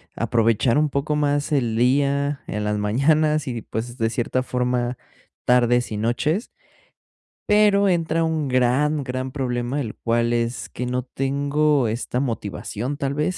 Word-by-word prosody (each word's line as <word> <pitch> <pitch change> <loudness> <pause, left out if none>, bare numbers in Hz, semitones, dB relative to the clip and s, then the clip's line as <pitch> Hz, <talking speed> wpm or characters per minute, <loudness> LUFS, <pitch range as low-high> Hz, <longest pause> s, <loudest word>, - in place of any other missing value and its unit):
aprovechar 115 +2 +2
un 150 0 +2
poco 140 +2 -1
más 145 0 0
el 120 -6 +1
día, 140 +3 +1
en 105 0 -3
las 105 0 -1
mañanas 150 +9 +2
y, 120 -3 -3
pues, 120 +3 -5
de 115 0 +1
cierta 120 +2 -1
forma, 125 -1 -1 0.5
tardes 125 -1 +3
y 105 - -3
noches. 135 - -1 1.0
Pero 210 -1 +4
entra 165 -2 +1
un 160 -2 -1
gran, 130 +4 +2
gran 130 0 -4
problema, 125 0 -2
el 110 -5 -5
cual 115 0 0
es, 120 +1 -2
que 125 - -5
no 125 0 -2
tengo 140 +1 +1
esta 120 +3 -2
motivación, 120 +1 -3
tal 140 -1 -2
vez, 150 +5 -1
130 Hz, 150 wpm, -22 LUFS, 120-145 Hz, 1.0 s, Pero